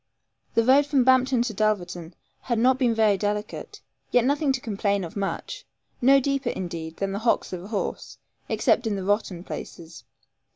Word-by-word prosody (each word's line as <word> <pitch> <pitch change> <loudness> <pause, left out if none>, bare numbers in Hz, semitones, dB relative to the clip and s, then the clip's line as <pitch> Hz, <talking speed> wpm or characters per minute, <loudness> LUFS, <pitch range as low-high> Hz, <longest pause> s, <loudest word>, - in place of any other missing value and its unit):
The 230 - +4
road 275 +4 +5
from 280 -3 +3
Bampton 260 -1 +3
to 240 -3 -3
Dulverton 180 -5 -2 0.3
had 235 -2 -1
not 255 +3 +3
been 240 -4 +2
very 215 -3 +3
delicate, 210 0 -4 0.3
yet 245 -1 +3
nothing 285 +1 +2
to 260 - -2
complain 200 -3 -1
of 165 - -8
much 210 - -4 0.4
no 270 +3 +6
deeper, 275 -1 -1
indeed, 165 -4 -5
than 195 -1 -2
the 200 - -3
hocks 230 -3 0
of 180 -1 -5
a - - -9
horse, 210 -2 -4 0.3
except 240 - +2
in 210 - 0
the 195 - -4
rotten 195 -3 -1
places. 170 -2 -9
220 Hz, 175 wpm, -25 LUFS, 195-260 Hz, 0.4 s, no